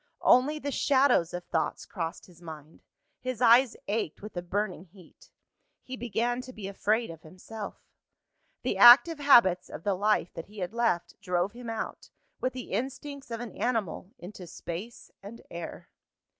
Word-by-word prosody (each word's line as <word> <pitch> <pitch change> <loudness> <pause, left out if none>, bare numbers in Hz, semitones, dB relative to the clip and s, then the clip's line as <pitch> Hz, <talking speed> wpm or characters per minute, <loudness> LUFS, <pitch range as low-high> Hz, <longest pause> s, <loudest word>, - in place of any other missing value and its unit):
Only 280 +5 +5
the 285 -1 -4
shadows 265 - +3
of 175 0 -5
thoughts 160 -2 -2
crossed 165 -5 -5
his 175 -2 -19
mind; 160 -2 -11 0.4
his 255 -3 -4
eyes 245 +1 +6
ached 205 -5 -2
with 210 - -9
a 175 - -2
burning 190 0 -3
heat. 180 -1 -19 0.5
He 260 - -7
began 240 +1 -1
to 255 0 -10
be 215 -5 -7
afraid 215 +2 0
of 165 -1 -12
himself. 200 +6 -8 0.9
The - - -1
active 280 +7 +9
habits 190 -11 +5
of 160 - -8
the 200 - +1
life 205 -1 +1
that 165 - -7
he 210 +1 -16
had 180 +1 -4
left, 230 -7 -1
drove 180 +2 0
him 240 0 -9
out, 225 - -5 0.3
with 255 - -1
the 255 -1 -8
instincts 275 +5 -4
of 230 0 -4
an 240 - -7
animal, 220 -6 -2
into 185 -3 -10
space 180 +8 -8
and 210 +4 -11
air. 170 0 -8
215 Hz, 165 wpm, -28 LUFS, 180-245 Hz, 0.9 s, active